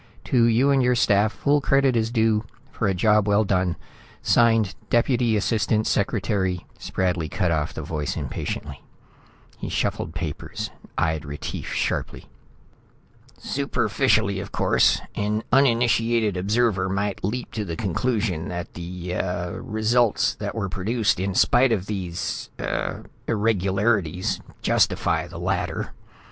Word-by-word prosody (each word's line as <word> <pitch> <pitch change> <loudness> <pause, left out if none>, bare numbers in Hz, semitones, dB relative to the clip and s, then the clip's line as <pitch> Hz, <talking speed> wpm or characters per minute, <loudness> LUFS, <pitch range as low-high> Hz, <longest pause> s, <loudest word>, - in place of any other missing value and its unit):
To 120 -3 +3
you 120 +5 +4
and 135 -1 +4
your 125 0 +3
staff, 105 -3 +3
full 145 +4 +1
credit 135 -2 +3
is 115 -1 +1
due 110 -2 +2 0.3
for 110 - -1
a 95 - +2
job 105 +2 +3
well 105 +1 +4
done. 90 -3 +1 0.5
Signed, 115 -4 +3 0.2
Deputy 120 -2 +2
Assistant 110 0 +1
Secretary 100 -3 0
" - - -29
Spradley 90 -4 -1
cut 90 -4 0
off 80 -1 -1
the 80 - -5
voice 75 0 -3
impatiently. - - -5 0.8
He - - -4
shuffled 80 - -2
papers, 80 -3 -5 0.3
eyed 80 -2 0
Retief 75 -1 -6
sharply. - - -2 1.1
"Superficially, 110 -6 +1
of 100 0 -7
course, - - +3
an 105 +1 -1
uninitiated 115 -4 +3
observer 100 0 +1
might 100 +1 -2
leap 120 +6 -3
to 110 - -3
the 85 -5 -4
conclusion 100 -3 -1
that 90 -1 -5
the 90 +1 -6
ah 90 -1 -2
results 110 +1 +1
that - - -5
were 105 -4 -1
produced 105 +3 0
in 95 0 -2
spite 125 +4 +4
of 100 -5 0
these... 95 -4 -4
ah... - - -3 0.3
irregularities 100 -4 +1 0.2
justify - - +2
the - - -10
latter." - - -2
105 Hz, 130 wpm, -24 LUFS, 90-115 Hz, 1.1 s, you